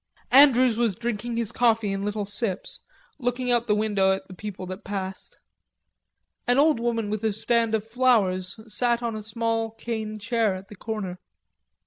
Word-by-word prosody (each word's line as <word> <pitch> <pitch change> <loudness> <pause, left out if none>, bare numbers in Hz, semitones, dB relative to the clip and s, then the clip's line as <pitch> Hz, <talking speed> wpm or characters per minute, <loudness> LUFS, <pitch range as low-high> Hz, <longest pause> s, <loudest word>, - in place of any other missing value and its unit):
Andrews 255 -3 +6
was 230 -5 +2
drinking 235 +1 -3
his 230 -3 0
coffee 225 -4 +2
in 195 0 -3
little 205 0 -2
sips, 200 -1 -2 0.4
looking 250 0 -1
out 240 -1 +4
of 235 - -21
the 210 - +3
window 205 -3 +2
at 190 - -5
the 185 - -10
people 190 -1 -7
that 185 +2 -7
passed. 190 -1 -6 1.1
An 245 +1 +3
old 295 -2 +4
woman 230 -3 -1
with 215 0 -3
a 220 - +2
stand 225 +1 +1
of 215 -1 -2
flowers 220 -6 +2
sat 235 +2 0
on 230 -2 -2
a 215 - -5
small 225 +1 -1
cane 220 -1 -5
chair 225 -2 0
at 190 +2 -10
the 210 - -10
corner. 195 -3 -5
220 Hz, 175 wpm, -25 LUFS, 205-235 Hz, 1.1 s, Andrews